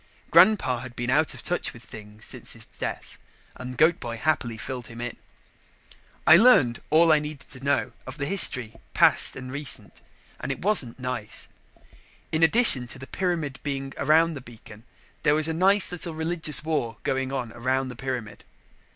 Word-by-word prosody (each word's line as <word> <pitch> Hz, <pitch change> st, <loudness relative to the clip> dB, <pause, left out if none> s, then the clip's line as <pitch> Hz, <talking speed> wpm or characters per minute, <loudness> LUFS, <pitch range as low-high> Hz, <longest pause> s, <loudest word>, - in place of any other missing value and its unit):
Grandpa 145 Hz, -, +4 dB
had 125 Hz, 0 st, -10 dB
been 120 Hz, 0 st, -3 dB
out 150 Hz, +3 st, +1 dB
of -, -, -9 dB
touch 175 Hz, +2 st, -1 dB
with 120 Hz, -, -14 dB
things 105 Hz, 0 st, -12 dB
since -, -, -4 dB
his -, -, -14 dB
death -, -, -6 dB, 0.4 s
and 125 Hz, 0 st, -8 dB
Goat 160 Hz, +2 st, +3 dB
boy 115 Hz, -2 st, -6 dB
happily 120 Hz, -5 st, -1 dB
filled 125 Hz, 0 st, -6 dB
him 115 Hz, 0 st, -11 dB
in. 120 Hz, 0 st, -5 dB, 1.1 s
I 160 Hz, -, +8 dB
learned 170 Hz, -, +4 dB
all 165 Hz, +1 st, +5 dB
I 155 Hz, -, +5 dB
needed 150 Hz, -2 st, -8 dB
to 130 Hz, 0 st, -10 dB
know 140 Hz, 0 st, 0 dB, 0.2 s
of -, -, -7 dB
the 140 Hz, -, -3 dB
history, 125 Hz, -, +1 dB, 0.2 s
past -, -, +4 dB
and 130 Hz, -1 st, -8 dB
recent, 145 Hz, +1 st, -3 dB, 0.4 s
and -, -, -4 dB
it -, -, -6 dB
wasn't 175 Hz, -, +3 dB
nice. 125 Hz, -4 st, -4 dB, 0.8 s
In 155 Hz, -, -1 dB
addition 165 Hz, -, +6 dB
to 135 Hz, -, -8 dB
the 130 Hz, -, -10 dB
pyramid 165 Hz, -6 st, -3 dB
being 135 Hz, -1 st, -5 dB
around 165 Hz, +2 st, +2 dB
the 140 Hz, -, -8 dB
beacon, 115 Hz, -2 st, -15 dB, 0.4 s
there 145 Hz, -, +3 dB
was 155 Hz, 0 st, +1 dB
a 160 Hz, -, -2 dB
nice 195 Hz, +4 st, +3 dB
little 170 Hz, -2 st, -4 dB
religious 160 Hz, -2 st, -1 dB
war 145 Hz, -9 st, -2 dB
going 130 Hz, 0 st, -2 dB
on 125 Hz, -4 st, -4 dB
around 130 Hz, +2 st, -1 dB
the 125 Hz, -, -8 dB
pyramid. 125 Hz, -4 st, -6 dB
135 Hz, 175 wpm, -25 LUFS, 120-160 Hz, 1.1 s, I